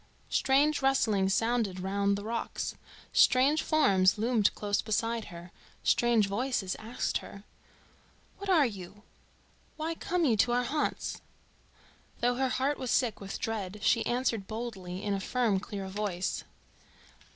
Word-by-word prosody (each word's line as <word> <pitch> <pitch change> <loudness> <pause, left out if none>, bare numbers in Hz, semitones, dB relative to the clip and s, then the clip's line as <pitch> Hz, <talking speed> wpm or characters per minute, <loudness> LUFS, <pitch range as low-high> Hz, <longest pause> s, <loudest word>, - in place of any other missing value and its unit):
Strange 285 +3 +3
rustlings 220 -8 +2
sounded 225 -3 0
round 200 +1 0
the 200 - -6
rocks, 230 +2 -3 0.4
strange 275 +4 +5
forms 195 -12 +3
loomed 220 -1 +2
close 205 -1 0
beside 230 +1 -1
her, 175 -1 -11 0.3
strange 235 -3 +3
voices 200 -1 -1
asked 225 +3 -2
her: 200 - -11 1.0
"What 400 0 -6
are 330 -6 +5
you? 200 -2 -7 0.7
Why 320 +1 -2
come 345 +1 -1
you 240 -6 +3
to 240 +4 +3
our 245 0 +2
haunts?" 295 +5 -2 1.0
Though 245 +1 +2
her 260 +1 0
heart 270 +3 0
was 255 - -4
sick 235 -4 +1
with 195 0 -5
dread 210 -3 -4
she - - +3
answered 240 -5 -1
boldly 200 -5 -6
in 205 - -1
a 195 - -1
firm 220 -1 +1
clear 195 -1 -6
voice. 190 -2 -3
225 Hz, 140 wpm, -30 LUFS, 200-255 Hz, 1.0 s, strange